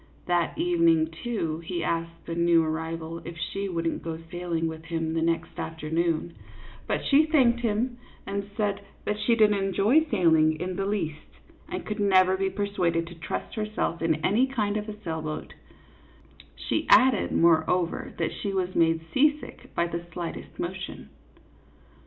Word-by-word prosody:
That 175 Hz, -1 st, 0 dB
evening, 335 Hz, -1 st, +3 dB
too, 170 Hz, -10 st, -2 dB
he 170 Hz, +1 st, -4 dB
asked 165 Hz, 0 st, -3 dB
the 165 Hz, -, -4 dB
new 170 Hz, -1 st, +4 dB
arrival 160 Hz, +1 st, -4 dB
if 170 Hz, -1 st, -8 dB
she 195 Hz, +4 st, -3 dB
wouldn't 165 Hz, -2 st, -2 dB
go 165 Hz, -1 st, -4 dB
sailing 175 Hz, -2 st, -2 dB
with 160 Hz, 0 st, -5 dB
him 165 Hz, -1 st, -2 dB
the 165 Hz, -, 0 dB
next 165 Hz, 0 st, -1 dB
afternoon; 160 Hz, +1 st, -1 dB, 0.5 s
but -, -, -1 dB
she 300 Hz, +2 st, +5 dB
thanked 255 Hz, -7 st, +4 dB
him 240 Hz, +2 st, -1 dB, 0.3 s
and 200 Hz, 0 st, -4 dB
said 205 Hz, -2 st, 0 dB, 0.2 s
that 210 Hz, 0 st, -1 dB
she 235 Hz, -, +3 dB
did 215 Hz, -2 st, +5 dB
n't 200 Hz, -1 st, +1 dB
enjoy 205 Hz, +10 st, +3 dB
sailing 160 Hz, -6 st, +3 dB
in 180 Hz, +1 st, -3 dB
the 195 Hz, +1 st, -1 dB
least, 160 Hz, -7 st, -3 dB, 0.4 s
and 360 Hz, -, -4 dB
could 210 Hz, -, -4 dB
never 190 Hz, -2 st, +4 dB
be 195 Hz, 0 st, 0 dB
persuaded 185 Hz, -4 st, 0 dB
to 170 Hz, -, -10 dB
trust 165 Hz, -1 st, -5 dB
herself 215 Hz, -6 st, -2 dB
in 160 Hz, -1 st, +1 dB
any 230 Hz, +7 st, +3 dB
kind 215 Hz, -6 st, -1 dB
of 210 Hz, 0 st, -3 dB
a 210 Hz, 0 st, -8 dB
sailboat; 160 Hz, -2 st, -4 dB, 1.0 s
she -, -, -2 dB
added, 255 Hz, -5 st, +5 dB
moreover, 170 Hz, +1 st, +2 dB
that -, -, -1 dB
she 200 Hz, -, -3 dB
was 185 Hz, -1 st, -1 dB
made 165 Hz, -1 st, +2 dB
seasick 295 Hz, +2 st, +1 dB
by 170 Hz, -, +2 dB
the 170 Hz, 0 st, -4 dB
slightest 170 Hz, 0 st, -6 dB
motion. 180 Hz, -, -5 dB
180 Hz, 160 wpm, -27 LUFS, 165-210 Hz, 1.0 s, she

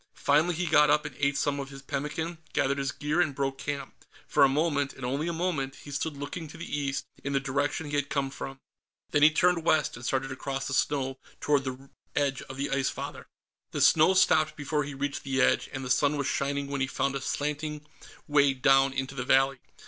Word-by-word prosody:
Finally, 155 Hz, +5 st, +2 dB
he 175 Hz, +2 st, -1 dB
got 150 Hz, -2 st, +5 dB
up 150 Hz, +1 st, +3 dB
and 150 Hz, -, -6 dB
ate 140 Hz, 0 st, +1 dB
some 145 Hz, -1 st, 0 dB
of 135 Hz, 0 st, -5 dB
his 135 Hz, 0 st, -11 dB
pemmican, 155 Hz, +5 st, -3 dB
gathered 140 Hz, +1 st, +1 dB
his 135 Hz, -1 st, -1 dB
gear 150 Hz, +8 st, 0 dB
and 150 Hz, -6 st, 0 dB
broke 135 Hz, -1 st, -2 dB
camp. 140 Hz, -1 st, -5 dB, 0.2 s
For -, -, +3 dB
a 135 Hz, -, +7 dB
moment, 145 Hz, -1 st, 0 dB
and 130 Hz, -, -7 dB
only 140 Hz, +6 st, -1 dB
a -, -, 0 dB
moment, 160 Hz, -6 st, -2 dB
he 145 Hz, -, -9 dB
stood 145 Hz, +1 st, -3 dB
looking 145 Hz, +4 st, -5 dB
to 150 Hz, -, -11 dB
the 170 Hz, -, -6 dB
east, 140 Hz, -1 st, -2 dB, 0.2 s
in 140 Hz, -, -2 dB
the 135 Hz, -, +3 dB
direction 145 Hz, +3 st, -1 dB
he 145 Hz, -, 0 dB
had 145 Hz, 0 st, -1 dB
come 140 Hz, -1 st, -1 dB
from. 135 Hz, 0 st, -7 dB, 0.5 s
Then 145 Hz, -, +2 dB
he 150 Hz, -, +9 dB
turned 175 Hz, +1 st, +2 dB
west 155 Hz, -3 st, +2 dB
and 120 Hz, -, -10 dB
started 135 Hz, +2 st, -1 dB
across 135 Hz, +1 st, -4 dB
the 130 Hz, -, -3 dB
snow 135 Hz, -1 st, 0 dB, 0.2 s
toward 145 Hz, -2 st, +1 dB
the 130 Hz, +1 st, -6 dB, 0.2 s
edge 140 Hz, -2 st, 0 dB
of 130 Hz, -, -9 dB
the 140 Hz, +1 st, -2 dB
Ice 135 Hz, -1 st, +1 dB
Father. -, -, -7 dB, 0.5 s
The -, -, -2 dB
snow 160 Hz, +4 st, +6 dB
stopped 155 Hz, -4 st, +4 dB
before 150 Hz, 0 st, -1 dB
he 145 Hz, -1 st, -7 dB
reached 140 Hz, +1 st, -3 dB
the 135 Hz, -1 st, -2 dB
edge, -, -, +3 dB
and 135 Hz, 0 st, -5 dB
the 125 Hz, -, -2 dB
sun 145 Hz, +3 st, +3 dB
was 140 Hz, -, -1 dB
shining 140 Hz, +1 st, -1 dB
when 140 Hz, -1 st, -3 dB
he 130 Hz, -, +1 dB
found 140 Hz, 0 st, -1 dB
a 135 Hz, -, -3 dB
slanting 150 Hz, +1 st, -3 dB, 0.4 s
way 140 Hz, -2 st, +4 dB
down 135 Hz, 0 st, +4 dB
into 135 Hz, 0 st, -3 dB
the 130 Hz, -2 st, -3 dB
valley. 135 Hz, +1 st, +3 dB
140 Hz, 225 wpm, -28 LUFS, 135-150 Hz, 0.5 s, he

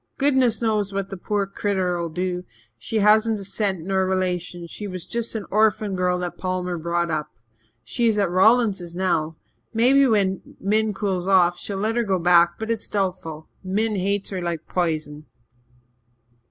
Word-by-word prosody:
Goodness 260 Hz, -5 st, +2 dB
knows 210 Hz, -3 st, +1 dB
what 195 Hz, 0 st, -3 dB
the -, -, -4 dB
poor 200 Hz, +2 st, -1 dB
critter'll 185 Hz, -4 st, -1 dB
do. 180 Hz, +2 st, -3 dB, 0.3 s
She -, -, -7 dB
hasn't 215 Hz, +1 st, +4 dB
a 195 Hz, -, -7 dB
cent 195 Hz, -2 st, -1 dB
nor 190 Hz, +3 st, 0 dB
a -, -, +1 dB
relation 180 Hz, -2 st, -2 dB
she 205 Hz, +5 st, -6 dB
was 185 Hz, -3 st, -6 dB
just 235 Hz, -1 st, -3 dB
an 215 Hz, -3 st, -3 dB
orphan 215 Hz, -1 st, +2 dB
girl 180 Hz, 0 st, +1 dB
that 180 Hz, -1 st, -5 dB
Palmer 180 Hz, -2 st, -2 dB
brought 170 Hz, +1 st, -1 dB
up. 150 Hz, -1 st, -2 dB, 0.5 s
She 240 Hz, -2 st, 0 dB
is 220 Hz, -2 st, +2 dB
at 200 Hz, -2 st, +2 dB
Rawlingses 190 Hz, -3 st, +3 dB
now. 165 Hz, -4 st, 0 dB, 0.4 s
Maybe 265 Hz, +4 st, +5 dB
when 195 Hz, -5 st, 0 dB
Min 215 Hz, +1 st, +1 dB
cools 190 Hz, -2 st, -2 dB
off, 175 Hz, -2 st, +4 dB
she'll 200 Hz, -, -4 dB
let 220 Hz, +4 st, -1 dB
her 240 Hz, -, +2 dB
go 195 Hz, -4 st, +1 dB
back 175 Hz, 0 st, +4 dB
but 220 Hz, +1 st, -3 dB
it's 225 Hz, -2 st, -3 dB
doubtful. 180 Hz, -6 st, -3 dB, 0.2 s
Min 210 Hz, +3 st, 0 dB
hates 200 Hz, +1 st, -1 dB
her 185 Hz, -2 st, -3 dB
like 170 Hz, -2 st, -4 dB
p'isen." 155 Hz, -4 st, -2 dB
190 Hz, 170 wpm, -23 LUFS, 175-215 Hz, 0.5 s, Maybe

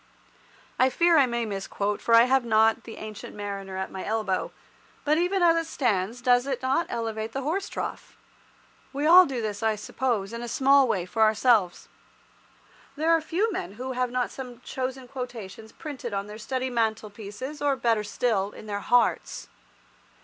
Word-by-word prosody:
I 255 Hz, -, +5 dB
fear 340 Hz, +5 st, +3 dB
I 280 Hz, -4 st, +5 dB
may 235 Hz, -1 st, -1 dB
misquote, 200 Hz, 0 st, -3 dB
for 230 Hz, -, +4 dB
I 230 Hz, -, +8 dB
have 260 Hz, +1 st, +3 dB
not 225 Hz, 0 st, +3 dB
"The 225 Hz, -, -9 dB
Ancient 215 Hz, -1 st, -8 dB
Mariner" 200 Hz, -2 st, -5 dB
at 190 Hz, 0 st, -4 dB
my 190 Hz, -, -6 dB
elbow, 210 Hz, -3 st, -1 dB, 0.5 s
but 305 Hz, +2 st, +3 dB
even 360 Hz, +1 st, +1 dB
as 335 Hz, -1 st, +5 dB
it 330 Hz, -1 st, -1 dB
stands 230 Hz, -1 st, -1 dB
does 245 Hz, +1 st, +3 dB
it 260 Hz, -2 st, -3 dB
not 265 Hz, +6 st, +1 dB
elevate 225 Hz, -1 st, -3 dB
the 270 Hz, -, -3 dB
horse 365 Hz, +8 st, -2 dB
trough? -, -, -6 dB, 0.8 s
We 285 Hz, +2 st, -2 dB
all 355 Hz, +3 st, +8 dB
do 250 Hz, -4 st, -3 dB
this, 205 Hz, -2 st, -3 dB
I 220 Hz, -1 st, +1 dB
suppose, 210 Hz, -1 st, -2 dB
in 235 Hz, -, -5 dB
a 240 Hz, -, -5 dB
small 270 Hz, +2 st, +4 dB
way 185 Hz, -6 st, 0 dB
for 220 Hz, +5 st, -3 dB
ourselves. 220 Hz, -4 st, +3 dB, 1.1 s
There 315 Hz, +3 st, +1 dB
are 330 Hz, -1 st, +4 dB
few 380 Hz, +8 st, 0 dB
men 190 Hz, -, -4 dB
who 255 Hz, +4 st, -5 dB
have 250 Hz, -1 st, -1 dB
not 250 Hz, 0 st, -1 dB
some 250 Hz, -3 st, -8 dB
chosen 260 Hz, 0 st, -5 dB
quotations 230 Hz, -5 st, -8 dB
printed 265 Hz, -8 st, -6 dB
on 200 Hz, 0 st, -2 dB
their 210 Hz, +1 st, -9 dB
study 260 Hz, +3 st, -3 dB
mantelpieces, 220 Hz, +3 st, -3 dB
or, 285 Hz, -1 st, +2 dB
better 230 Hz, -4 st, +1 dB
still, 210 Hz, -3 st, -1 dB
in -, -, -11 dB
their 205 Hz, -1 st, -3 dB
hearts. 245 Hz, +3 st, +1 dB
235 Hz, 180 wpm, -26 LUFS, 215-265 Hz, 1.1 s, I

